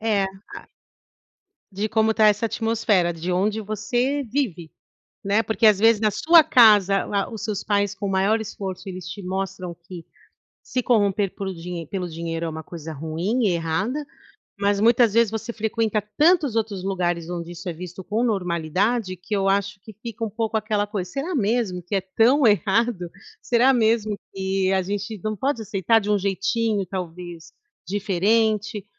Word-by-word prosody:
É, 215 Hz, -3 st, +1 dB
ah 190 Hz, +1 st, -10 dB, 1.0 s
De 205 Hz, +3 st, -2 dB
como 220 Hz, 0 st, +2 dB
tá 215 Hz, -1 st, +4 dB
essa 210 Hz, +2 st, +1 dB
atmosfera 220 Hz, -6 st, +1 dB
de 170 Hz, +2 st, -3 dB
onde 210 Hz, +4 st, 0 dB
você 240 Hz, +7 st, -1 dB
vive, 185 Hz, -, -2 dB, 0.5 s
né, 200 Hz, +3 st, +2 dB
porque 220 Hz, +1 st, +1 dB
às 210 Hz, -3 st, +6 dB
vezes 225 Hz, 0 st, +4 dB
na 215 Hz, -1 st, +3 dB
sua 325 Hz, -, +6 dB
casa, 210 Hz, -, +5 dB
a 200 Hz, -1 st, -2 dB
os 225 Hz, -, -6 dB
seus 210 Hz, -2 st, -3 dB
pais 205 Hz, -1 st, 0 dB
com 200 Hz, +2 st, -5 dB
o -, -, -1 dB
maior 195 Hz, +4 st, +2 dB
esforço, 195 Hz, -3 st, -6 dB
eles 185 Hz, -1 st, -7 dB
te 200 Hz, +1 st, -7 dB
mostram 185 Hz, -1 st, -4 dB
que 180 Hz, -2 st, -8 dB, 0.6 s
se 255 Hz, -, -2 dB
corromper 205 Hz, -4 st, +2 dB
por 190 Hz, -1 st, -4 dB
dinhe 170 Hz, -1 st, -6 dB
pelo 180 Hz, -1 st, -4 dB
dinheiro 165 Hz, 0 st, -4 dB
é -, -, -2 dB
uma 160 Hz, 0 st, -6 dB
coisa 160 Hz, -2 st, -8 dB
ruim 165 Hz, -, -1 dB
e -, -, +3 dB
errada, 185 Hz, -, -1 dB, 0.5 s
mas 200 Hz, 0 st, +1 dB
muitas 230 Hz, 0 st, +4 dB
vezes 230 Hz, -1 st, +4 dB
você 220 Hz, +2 st, -4 dB
frequenta 220 Hz, -1 st, -1 dB, 0.2 s
tantos 310 Hz, -6 st, +4 dB
outros 205 Hz, -4 st, -2 dB
lugares 175 Hz, -3 st, -1 dB
onde 170 Hz, -1 st, -5 dB
isso 175 Hz, +2 st, -9 dB
é 175 Hz, -, -2 dB
visto 180 Hz, +2 st, -8 dB
com 215 Hz, +5 st, -1 dB
normalidade, 185 Hz, +1 st, 0 dB
que 185 Hz, +4 st, -4 dB
eu 195 Hz, 0 st, +1 dB
acho 200 Hz, 0 st, -1 dB
que 220 Hz, -, -12 dB
fica 230 Hz, -1 st, -6 dB
um 225 Hz, -, -1 dB
pouco 220 Hz, +1 st, -3 dB
aquela 215 Hz, -1 st, 0 dB
coisa: 190 Hz, -4 st, -4 dB
"Será 315 Hz, +5 st, -3 dB
mesmo 210 Hz, -6 st, 0 dB
que 190 Hz, +3 st, -3 dB
é -, -, +3 dB
tão 230 Hz, +8 st, +3 dB
errado? 205 Hz, -1 st, +1 dB, 0.3 s
Será 250 Hz, +3 st, +3 dB
mesmo 220 Hz, -2 st, +2 dB, 0.2 s
que 190 Hz, 0 st, 0 dB
a 190 Hz, -1 st, +2 dB
gente 205 Hz, +2 st, -4 dB
não 215 Hz, 0 st, -2 dB
pode 260 Hz, +1 st, -1 dB
aceitar 205 Hz, +2 st, +2 dB
de 210 Hz, 0 st, -5 dB
um 210 Hz, -, +3 dB
jeitinho 200 Hz, +2 st, 0 dB
talvez 175 Hz, -2 st, -7 dB, 0.3 s
diferente?". 210 Hz, +2 st, 0 dB
205 Hz, 175 wpm, -23 LUFS, 185-225 Hz, 1.0 s, às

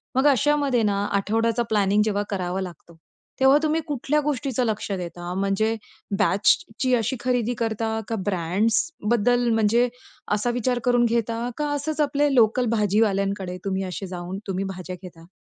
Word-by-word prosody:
मग 265 Hz, +3 st, +4 dB
अशा 290 Hz, +2 st, +4 dB
मध्ये 270 Hz, -5 st, +1 dB
ना, 200 Hz, -1 st, +1 dB
आठवड्याचा 225 Hz, +4 st, +1 dB
प्लॅनिंग 205 Hz, -1 st, +3 dB
जेव्हा 205 Hz, -1 st, 0 dB
करावं 185 Hz, -1 st, -2 dB
लागतो, 170 Hz, -2 st, -9 dB, 0.4 s
तेव्हा 265 Hz, +2 st, +6 dB
तुम्ही 315 Hz, +1 st, +1 dB
कुठल्या 290 Hz, +1 st, 0 dB
गोष्टीचं 270 Hz, -3 st, -1 dB
लक्ष 215 Hz, -2 st, -2 dB
देता? 175 Hz, -1 st, -5 dB
म्हणजे 200 Hz, +3 st, +1 dB, 0.4 s
बॅचची 220 Hz, +5 st, +2 dB
अशी 240 Hz, +2 st, 0 dB
खरेदी 245 Hz, -1 st, 0 dB
करता 220 Hz, -1 st, -1 dB
का 225 Hz, -, -2 dB
ब्रँड्सबद्दल 220 Hz, -, +1 dB
म्हणजे 225 Hz, +3 st, +3 dB, 0.5 s
असा 210 Hz, +3 st, 0 dB
विचार 245 Hz, +1 st, 0 dB
करून 245 Hz, -1 st, +4 dB
घेता 230 Hz, +1 st, -1 dB
का? 300 Hz, 0 st, -1 dB
असंच 300 Hz, +2 st, -2 dB
आपले 290 Hz, -1 st, +2 dB
लोकल 235 Hz, +1 st, +4 dB
भाजीवाल्यांकडे 200 Hz, -3 st, +1 dB
तुम्ही 195 Hz, -1 st, -1 dB
असे 185 Hz, 0 st, -5 dB
जाऊन 180 Hz, +1 st, -6 dB
तुम्ही 195 Hz, 0 st, -2 dB
भाज्या 185 Hz, 0 st, -6 dB
घेता? 165 Hz, -2 st, -12 dB
220 Hz, 150 wpm, -24 LUFS, 195-245 Hz, 0.5 s, तेव्हा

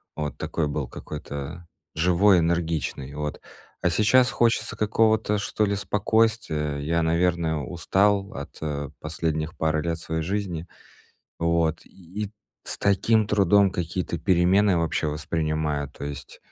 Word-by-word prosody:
Вот 75 Hz, -2 st, -4 dB
такой 80 Hz, -3 st, -2 dB
был 75 Hz, -3 st, -3 dB
какой-то 75 Hz, +3 st, -7 dB, 0.3 s
живой, 90 Hz, +3 st, +4 dB
энергичный. 80 Hz, -5 st, -1 dB
Вот. 75 Hz, 0 st, -4 dB, 0.4 s
А 90 Hz, -, +4 dB
сейчас 110 Hz, +8 st, +4 dB
хочется 115 Hz, -2 st, +1 dB
какого-то, 110 Hz, 0 st, +2 dB
что 105 Hz, +1 st, 0 dB
ли, 100 Hz, 0 st, 0 dB
спокойствия. 100 Hz, -6 st, +1 dB
Я, 85 Hz, +4 st, 0 dB
наверное, 85 Hz, 0 st, +1 dB
устал 95 Hz, +6 st, +1 dB
от 70 Hz, -, -8 dB, 0.4 s
последних 80 Hz, 0 st, -3 dB
пары 80 Hz, -1 st, +1 dB
лет 85 Hz, 0 st, -2 dB
своей 80 Hz, 0 st, -3 dB
жизни. 90 Hz, -1 st, -3 dB, 0.7 s
Вот, 85 Hz, -1 st, +1 dB
и 95 Hz, +3 st, -7 dB, 0.3 s
с -, -, -1 dB
таким 105 Hz, +2 st, +3 dB
трудом 100 Hz, -1 st, +4 dB
какие-то 85 Hz, 0 st, -3 dB
перемены 95 Hz, +1 st, +3 dB
вообще 80 Hz, -1 st, 0 dB
воспринимаю. 75 Hz, -1 st, -1 dB
То 70 Hz, -, -9 dB
есть 70 Hz, 0 st, -7 dB
85 Hz, 125 wpm, -25 LUFS, 80-100 Hz, 0.7 s, живой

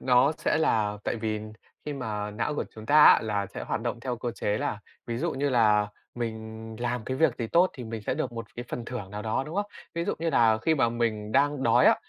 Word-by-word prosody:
Nó 130 Hz, +3 st, +4 dB
sẽ -, -, +1 dB
là 105 Hz, -9 st, +1 dB
tại -, -, -1 dB
vì 110 Hz, -1 st, -2 dB, 0.4 s
khi 150 Hz, -, -3 dB
mà 105 Hz, -6 st, -3 dB
não 115 Hz, +8 st, -2 dB
của -, -, -1 dB
chúng 110 Hz, 0 st, -10 dB
ta 150 Hz, +3 st, +7 dB
á -, -, +8 dB
là 105 Hz, -2 st, -1 dB
sẽ 100 Hz, -, -7 dB
hoạt -, -, -2 dB
động 120 Hz, 0 st, -3 dB
theo 125 Hz, 0 st, -3 dB
cơ 120 Hz, 0 st, -3 dB
chế 105 Hz, -2 st, -1 dB
là 105 Hz, -, -2 dB, 0.3 s
ví 115 Hz, -1 st, -3 dB
dụ 165 Hz, +3 st, -1 dB
như 140 Hz, +2 st, 0 dB
là 105 Hz, -5 st, +4 dB, 0.3 s
mình 110 Hz, -1 st, -5 dB
làm 120 Hz, -1 st, -2 dB
cái 130 Hz, -, -2 dB
việc 145 Hz, -4 st, +3 dB
gì 115 Hz, -, -1 dB
tốt 175 Hz, +9 st, +4 dB
thì 125 Hz, -, -7 dB
mình 110 Hz, -1 st, -6 dB
sẽ 115 Hz, -, -1 dB
được 135 Hz, -4 st, -2 dB
1 115 Hz, -1 st, -5 dB
cái 120 Hz, -, -5 dB
phần 120 Hz, -, -4 dB
thưởng 115 Hz, -6 st, -6 dB
nào 105 Hz, +1 st, -5 dB
đó, 110 Hz, +4 st, 0 dB
đúng 155 Hz, -, -7 dB
không? 205 Hz, 0 st, 0 dB, 0.3 s
Ví 170 Hz, 0 st, -1 dB
dụ -, -, -1 dB
như 165 Hz, +1 st, 0 dB
là 115 Hz, -6 st, +4 dB
khi 160 Hz, -, +3 dB
mà 130 Hz, -6 st, +3 dB
mình 110 Hz, -3 st, -2 dB
đang 140 Hz, +1 st, +2 dB
đói -, -, +4 dB
á -, -, +7 dB
120 Hz, 260 wpm, -27 LUFS, 110-135 Hz, 0.4 s, á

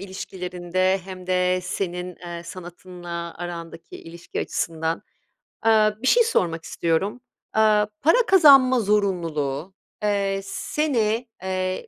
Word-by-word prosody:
ilişkilerinde 185 Hz, -1 st, -2 dB
hem 185 Hz, -1 st, -9 dB
de, 185 Hz, 0 st, +1 dB
senin, 180 Hz, -1 st, -4 dB
eee, 170 Hz, -1 st, -8 dB
sanatınla 175 Hz, -1 st, -8 dB
arandaki 170 Hz, -1 st, -7 dB
ilişki 170 Hz, +1 st, -7 dB
açısından. 165 Hz, 0 st, -2 dB, 0.6 s
Aaa, 215 Hz, -1 st, +3 dB
bir 260 Hz, -, -1 dB
şey 475 Hz, -, +6 dB
sormak 170 Hz, -, 0 dB
istiyorum. 170 Hz, +11 st, -1 dB, 0.3 s
Aaa, 215 Hz, -1 st, +4 dB, 0.2 s
para 445 Hz, -, +4 dB
kazanma 275 Hz, -8 st, +7 dB
zorunluluğu, 175 Hz, -6 st, -1 dB, 0.3 s
eee, 200 Hz, -1 st, 0 dB
seni, 235 Hz, -2 st, -1 dB, 0.2 s
eee, 185 Hz, 0 st, -2 dB
185 Hz, 105 wpm, -23 LUFS, 175-210 Hz, 0.6 s, kazanma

